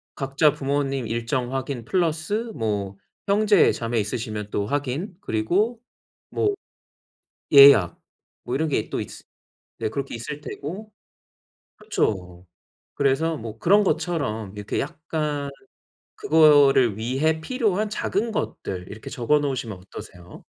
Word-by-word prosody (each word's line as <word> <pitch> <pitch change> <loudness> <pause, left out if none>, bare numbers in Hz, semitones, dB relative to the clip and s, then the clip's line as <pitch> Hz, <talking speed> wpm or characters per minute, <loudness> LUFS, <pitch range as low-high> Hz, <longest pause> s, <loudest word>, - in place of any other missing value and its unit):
각자 140 +2 +2
부모님 140 -3 -1
일정 120 +3 -2
확인 135 -2 -3
플러스 180 - -1
뭐 105 -5 -2 0.3
형제자매 200 - +3
있으시면 105 0 -3
또 100 - -1
확인 145 - -3
그리고 200 - 0 0.5
뭐 410 -1 +1 1.0
예약 140 - +8 0.5
뭐 125 - -3
이런 155 +3 0
게 110 -7 -1
또 - - -3
있 - - -5 0.7
네 - - -1
그렇게 135 +5 -4
있을 145 +6 -6
테고. 190 +10 -7 0.9
그쵸. 90 -3 -2 0.5
그래서 145 +4 +1
뭐 110 -2 -8
그런 205 +3 +4
것처럼 150 - -1
이렇게 105 - -3
약간 150 -3 -3 0.7
그거를 145 -8 +5
위해 140 +8 0
필요한 215 -2 0
작은 220 +2 -1
것들 90 - -4
이렇게 110 +2 -9
적어 140 +3 +2
놓으시면 130 -8 -3
어떠세요? 90 -1 -12
140 Hz, 250 characters per minute, -24 LUFS, 110-160 Hz, 1.0 s, 예약